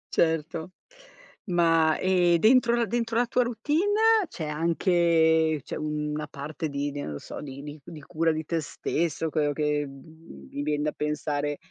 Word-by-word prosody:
Certo, 160 +2 0 0.7
ma 165 -3 +3
e 180 -2 +3
dentro 235 +3 +5
la 235 -1 +1
dentro 230 +1 -2
la 245 - +3
tua 250 +1 +1
routine 410 - +2
c'è 165 - -6
anche 160 -1 +2
c'è - - -6
una 150 0 -3
parte 150 +3 -5
di 140 +1 -2
di 145 - -5
non 75 - -5
lo 70 - -5
so, - - -8
di 140 -1 -8
di 150 +1 -8
c 140 - -14
di 160 -3 -9
cura 165 +3 0
di 155 0 -3
te 165 0 -1
stesso, 160 +1 -2
quello 150 -2 +1
che, 150 -1 0
mhmm, 135 - -14
mi 145 - -4
vien 150 0 -1
da 150 - 0
pensare, 145 -1 -2
160 Hz, 175 wpm, -26 LUFS, 150-175 Hz, 0.7 s, dentro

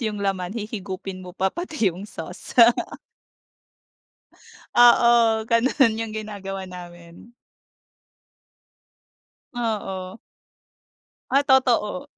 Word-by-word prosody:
yung 210 -3 -3
laman 190 0 -2
hihigupin 195 -3 -6
mo 180 -1 -11
pa, 190 0 0
pati 305 - -1
yung 195 +4 -10
sauce. 175 +8 -10 2.2
Oo, 235 -2 +5
ganun 230 0 +2
yung 225 -1 -4
ginagawa 195 -3 -6
namin. 175 +3 -12 2.2
Oo. 200 -4 -4 1.1
Ay 280 +2 +3
totoo. 265 0 +2
210 Hz, 80 wpm, -23 LUFS, 190-235 Hz, 2.2 s, Oo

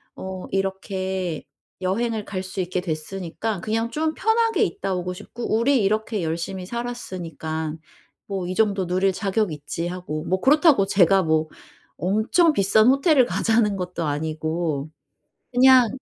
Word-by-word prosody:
어 190 -1 -6
이렇게 190 -3 -2 0.4
여행을 215 +4 -1
갈 185 -2 -4
수 190 0 -4
있게 180 0 -2
됐으니까 180 +5 -4
그냥 225 +4 -1
좀 315 +2 -1
편하게 450 +1 +2
있다 195 - -2
오고 180 0 -3
싶고 230 +5 -4
우리 245 0 +3
이렇게 215 0 0
열심히 170 +3 -3
살았으니깐 170 -9 -5 0.5
뭐 190 -3 -3
이 185 - -3
정도 200 -3 +2
누릴 185 +2 +2
자격 200 0 0
있지 150 +3 -4
하고." 175 -4 -5
뭐 185 +1 0
그렇다고 295 - +5
제가 195 0 +4
뭐 160 -1 +1 0.5
엄청 220 - +2
비싼 210 0 +4
호텔을 275 0 +5
가자는 225 -3 +1
것도 180 -2 -3
아니고 155 0 -2 0.6
그냥 255 -1 +6
190 Hz, 290 characters per minute, -23 LUFS, 175-225 Hz, 0.6 s, 그냥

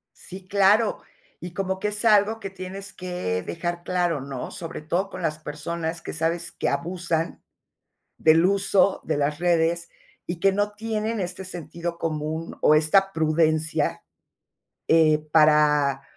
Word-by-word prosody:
Sí, 185 0 -10
claro. 205 +2 +3 0.4
Y 175 0 -7
como 190 -1 -2
que 210 - -1
es 210 +2 -1
algo 215 +1 +4
que 195 -2 -6
tienes 195 +1 -8
que, 180 - -3
dejar 175 - -4
claro, 175 -5 0
¿no? 135 -2 -6
Sobre 165 -2 -7
todo 175 +5 -1
con - - -7
las 155 0 -1
personas 160 +2 -5
que - - -6
sabes 165 +2 -1
que - - -2
abusan, 170 -1 -2 0.7
del 160 +2 +5
uso 200 0 +2
de - - -1
las 145 +1 0
redes, 170 0 +1 0.4
y 175 0 -4
que 195 0 +4
no 205 +1 0
tienen 220 0 -3
este 185 +1 -4
sentido 170 -1 -6
común, 160 0 -3
o 155 - +6
esta 195 +6 +3
prudencia, 155 -1 +1 0.8
eh, 155 -2 +5
para, 150 -3 +4
170 Hz, 145 wpm, -24 LUFS, 155-190 Hz, 0.8 s, o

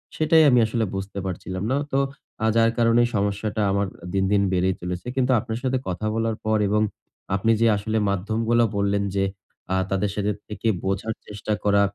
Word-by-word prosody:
সেটাই 160 0 +5
আমি 125 - +5
আসলে 110 +1 0
বুঝতে 95 +1 -5
পারছিলাম 95 0 -4
না। 135 - +2
তো 135 - +2 0.4
আ - - +3
যার 115 0 +4
কারণে 115 0 +4
সমস্যাটা 105 +2 -1
আমার 100 0 +1 0.3
দিন, 95 -1 +2
দিন 100 -1 +4
বেড়েই 90 +1 +2
চলেছে। 90 +5 -5
কিন্তু 130 -1 +2
আপনার 110 +1 -4
সাথে 130 0 +1
কথা 90 +4 -3
বলার 115 0 0
পর 110 0 +2
এবং 105 +2 +2 0.5
আপনি 105 +4 +2
যে 115 - +5
আসলে 110 +2 -2
মাধ্যমগুলো 110 +5 +1
বললেন 100 0 +1
যে, 95 - +2 0.5
আ - - +2
তাদের 95 +1 0
সাথে 105 0 0 0.2
থেকে 105 +2 -4 0.2
বোঝার 100 +3 -1
চেষ্টা 105 +1 -3
করা, 100 -1 +4
105 Hz, 180 wpm, -24 LUFS, 100-115 Hz, 0.5 s, সেটাই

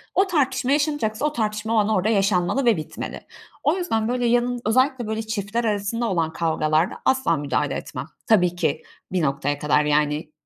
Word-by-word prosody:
O 385 +1 +4
tartışma 270 -5 0
yaşanacaksa, 290 -5 0
o 300 - 0
tartışma 215 0 -2
o - - +2
an 210 0 +3
orada 215 0 +1
yaşanmalı 195 +4 +1
ve 225 -7 +4
bitmeli. 155 - -6 0.4
O 315 +6 +2
yüzden 225 -12 -1
böyle, 245 -1 0
yanın 245 +1 +1
özellikle 255 +1 +2
böyle 220 0 -2
çiftler 220 +1 -2
arasında 215 +3 -1
olan 165 -2 0
kavgalarda 160 0 +1
asla 260 - +2
müdahale 145 0 -1
etmem. - - -6 0.2
Tabii 180 -6 +3
ki, 155 -3 -1 0.3
bir 185 -2 0
noktaya 145 0 -1
kadar, 150 0 +2
yani, 150 +1 0
215 Hz, 170 wpm, -23 LUFS, 165-245 Hz, 0.4 s, O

